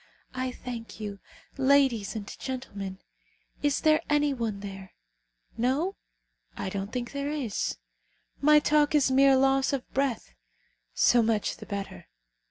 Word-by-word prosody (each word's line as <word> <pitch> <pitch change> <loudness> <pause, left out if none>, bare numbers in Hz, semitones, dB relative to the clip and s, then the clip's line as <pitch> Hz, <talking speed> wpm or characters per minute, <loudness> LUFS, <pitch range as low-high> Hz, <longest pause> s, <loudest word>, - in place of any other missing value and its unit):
I 255 0 -2
thank 230 -4 -8
you, 205 -2 -5 0.4
ladies 265 -6 +3
and 210 -2 -4
gentlemen. 200 -8 -5 0.6
Is 290 -1 +1
there 310 0 +4
any 295 -1 +3
one 225 -6 -3
there? 195 -1 -8 0.6
No? 275 - 0 0.6
I - - -3
don't 195 +2 -4
think 245 -1 -4
there 280 0 -3
is. 275 -9 -2 0.6
My 300 +1 +6
talk 300 0 +3
is 275 -3 +4
mere 270 +1 +6
loss 270 +1 +3
of 270 -2 -2
breath. 265 - -1 0.6
So 240 - +5
much 220 -2 0
the - - -11
better. 195 -3 -6
255 Hz, 135 wpm, -28 LUFS, 210-280 Hz, 0.6 s, My